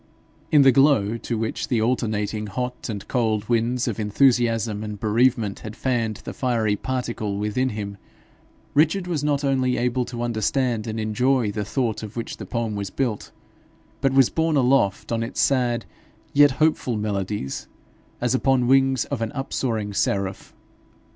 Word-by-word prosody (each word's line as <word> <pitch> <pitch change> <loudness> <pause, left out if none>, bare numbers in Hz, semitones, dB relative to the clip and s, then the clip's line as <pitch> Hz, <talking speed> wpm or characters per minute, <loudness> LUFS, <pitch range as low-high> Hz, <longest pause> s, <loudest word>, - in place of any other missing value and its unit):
In 145 -2 +7
the 135 - +7
glow 125 -5 +4
to 115 0 -3
which 110 0 -2
the 120 - +1
alternating 110 -2 -1
hot 125 +4 -4
and 100 -3 -5
cold 110 -4 0
winds 120 +1 +1
of 115 -3 -2
enthusiasm 115 -1 +2
and 105 -1 -6
bereavement 115 -1 +1
had 110 0 -8
fanned 115 -4 -1
the - - -6
fiery 115 -5 0
particle 115 -4 -3
within 105 +6 0
him, 100 -2 -5 0.8
Richard 165 +6 +3
was 165 -5 -2
not 145 -1 +1
only 130 -2 +1
able 125 +1 0
to 120 -1 -5
understand 120 0 0
and 110 0 -3
enjoy 120 +1 +1
the 105 0 -3
thought 115 +1 -1
of 110 +1 -8
which 115 - -4
the - - -8
poem 115 -2 -2
was 100 -1 -3
built, 120 -2 -3 0.7
but 135 -1 +2
was 135 -2 +4
borne 160 -2 +1
aloft 125 -7 +2
on 115 -1 0
its 115 - -4
sad 120 -3 +2 0.5
yet 145 0 +7
hopeful 135 -4 +1
melodies 100 -7 -3 0.5
as 125 0 0
upon 130 -1 +2
wings 135 0 +3
of 140 -5 -4
an 115 - -2
upsoaring 115 -6 -2
seraph. 100 -1 -1
120 Hz, 160 wpm, -23 LUFS, 105-130 Hz, 0.8 s, In